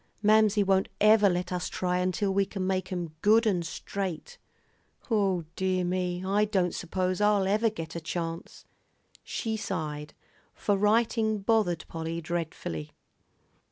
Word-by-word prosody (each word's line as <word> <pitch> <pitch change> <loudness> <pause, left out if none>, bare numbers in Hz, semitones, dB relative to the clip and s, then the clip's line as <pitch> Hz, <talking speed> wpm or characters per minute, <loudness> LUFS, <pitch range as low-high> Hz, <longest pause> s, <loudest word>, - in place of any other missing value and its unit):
"Mamsie 215 0 +5
won't 190 -1 +2
ever 210 -1 +6
let 180 0 -2
us 180 -1 -2
try 180 0 -1
until 185 +2 0
we 200 +1 +3
can 190 -1 -4
make 185 0 -1
'em 175 -4 -4
good 220 +3 +5
and 185 -5 +1
straight. 180 +1 -5 0.7
O 195 -5 +2
dear 185 -1 0
me, 180 0 -2
I 200 +2 +2
don't 190 -4 +1
s'pose 185 +2 -2
I'll 205 -2 +3
ever 215 +3 +2
get 165 -7 -7
a 170 - -4
chance." 165 0 -5 0.6
She 225 -1 -3
sighed; 150 -8 -4 0.4
for 205 - +1
writing 220 +1 +2
bothered 200 -7 +1
Polly 165 0 -4
dreadfully. 160 - -4
185 Hz, 140 wpm, -28 LUFS, 175-210 Hz, 0.7 s, ever